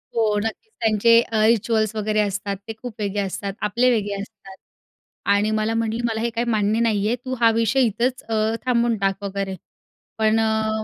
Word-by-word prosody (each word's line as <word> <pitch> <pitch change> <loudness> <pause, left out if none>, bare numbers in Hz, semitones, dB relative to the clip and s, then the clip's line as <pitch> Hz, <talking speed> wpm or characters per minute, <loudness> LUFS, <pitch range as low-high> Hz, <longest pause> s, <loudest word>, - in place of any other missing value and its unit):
हो 220 -2 +2
नक्कीच, 225 - -5
त्यांचे 225 +1 +5
अ, 220 -2 0
रिच्युअल्स 220 -1 +2
वगैरे 215 0 0
असतात 200 -1 -1
ते 225 - -4
खूप 245 -3 -6
वेगळे 205 0 -2
असतात. 195 0 -4
आपले 235 +5 +2
वेगळे 205 -4 0
असतात 200 -2 -12 0.8
आणि 205 +2 +2
मला 215 +1 0
म्हटली, 225 0 -1
"मला 225 -1 -1
हे 235 - 0
काही 235 +1 -2
मान्य 215 0 +1
नाही 215 -3 +1
आहे, 235 - +1
तू 255 +1 -6
हा 230 -1 +5
विषय 230 +4 +2
इथंच 240 +4 -1
अ, - - -1 0.3
थांबवून 235 -2 +2
टाक 195 0 -1
वगैरे," 195 -1 -3 0.6
पण 220 0 +3
अ, 220 0 0
220 Hz, 185 wpm, -22 LUFS, 205-230 Hz, 0.8 s, त्यांचे